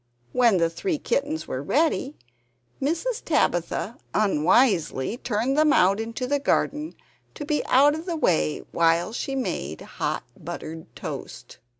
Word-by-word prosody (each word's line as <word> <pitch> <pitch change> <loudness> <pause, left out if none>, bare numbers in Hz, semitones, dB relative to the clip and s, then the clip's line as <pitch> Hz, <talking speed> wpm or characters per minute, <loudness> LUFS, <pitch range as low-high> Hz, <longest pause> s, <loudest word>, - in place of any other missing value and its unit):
When 235 -6 +4
the 165 -1 +3
three 330 - -2
kittens 295 +3 -2
were 130 - -3
ready, 290 - +1 0.7
Mrs. 335 - -1
Tabitha 225 - 0 0.2
unwisely 190 - +2
turned 240 +3 -1
them 305 0 +4
out 195 -3 +4
into 230 +3 -3
the 285 +3 +1
garden, 295 +2 0 0.4
to 295 - -6
be 300 0 0
out 285 +3 +5
of 320 +4 -6
the 340 -2 -2
way 165 - +1
while 170 +4 +2
she 270 +3 -3
made 80 - -3
hot - - -3
buttered 160 0 -7
toast. - - -8
250 Hz, 135 wpm, -25 LUFS, -, 0.7 s, out